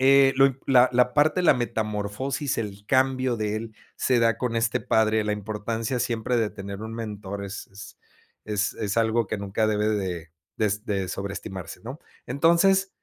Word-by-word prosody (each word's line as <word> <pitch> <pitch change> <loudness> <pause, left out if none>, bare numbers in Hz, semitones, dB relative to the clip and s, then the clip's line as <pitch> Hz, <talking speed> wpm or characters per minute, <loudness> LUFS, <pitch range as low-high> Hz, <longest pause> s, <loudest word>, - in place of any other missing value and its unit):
eh, 135 0 +6
lo 135 - +7
impo 135 -1 -4
la 130 -1 +6
la 125 0 +3
parte 155 +5 +3
de - - -1
la - - +7
metamorfosis, 115 +4 -2
el 105 -2 -5
cambio 130 -2 +2
de 105 0 -1
él, 110 -1 -7 0.2
se 125 -2 +2
da 115 0 +2
con 120 -2 -1
este 115 -1 +1
padre, 110 -2 +2
la 105 - 0
importancia 110 +3 -3
siempre 120 0 0
de 110 -2 +1
tener 100 0 -7
un 110 0 -6
mentor, 105 -3 -5
es 100 0 -7
es 100 +1 -11 0.5
es 105 -1 -1
es 105 -1 -3
algo 115 0 +2
que 110 - -2
nunca 100 +2 -1
debe 105 0 +1
de 90 -6 -2 0.3
de 110 - +1
s 105 +1 -1
de 100 -4 -1
sobreestimarse, 95 -2 -6
¿no? 130 +6 -7 0.3
Entonces 170 +8 +3
110 Hz, 185 wpm, -25 LUFS, 105-125 Hz, 0.5 s, lo